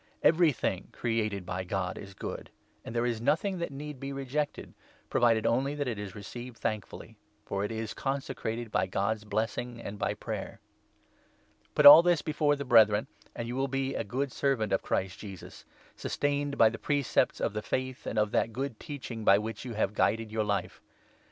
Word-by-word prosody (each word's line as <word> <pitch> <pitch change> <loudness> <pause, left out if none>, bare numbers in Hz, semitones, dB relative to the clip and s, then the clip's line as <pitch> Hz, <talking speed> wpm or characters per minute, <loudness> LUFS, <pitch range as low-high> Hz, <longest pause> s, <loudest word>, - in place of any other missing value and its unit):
Everything 155 - +3
created 110 -5 -1
by 95 +1 -3
God 95 0 -2
is 95 -1 -10
good, - - -6 0.3
and 115 - -8
there 120 +1 +1
is 115 -2 -1
nothing 185 - +1
4 - - -6
that 170 - -3
need 145 0 -7
be 135 +1 -5
rejected 140 +2 -3 0.2
— - - -32
provided 115 -2 +3
only 135 +4 +1
that 145 -2 -2
it 115 -4 -3
is 100 -3 -6
received 120 +4 -8
thankfully; 105 -2 -5 0.3
for 100 0 -2
it 105 - -2
is 110 -1 -4
consecrated 120 -4 -3
by 95 - +1
God's 100 +3 -1
blessing 115 +3 -2
and' 105 -3 -7
]by - - 0
5 - - -33
prayer. - - -5 1.2
Put - - +4
all 150 +3 +13
this 175 -2 +2
before 150 -1 +2
the 140 0 -5
Brethren, 110 -4 +5 0.3
and 120 -1 -4
you 120 - -4
will 135 +1 0
be 135 0 -1
a - - -2
good 130 +6 -2
6 - - -11
servant 135 -7 +1
of - - +2
Christ 95 0 -2
Jesus, 95 -4 -10 0.3
sustained 145 0 -1
by 115 - +7
the 115 - -7
precepts 145 -3 +1
of - - -1
the 105 - -2
Faith 130 +3 -3
and - - -3
of 105 -1 +2
that 115 - +1
Good 130 -1 -4
Teaching 130 -7 -6
by 100 -1 +6
which 110 +3 -5
you 120 - -5
have 105 -1 0
guided 110 0 +1
your 110 0 0
life. 100 -1 -2
115 Hz, 195 wpm, -30 LUFS, 105-140 Hz, 1.2 s, all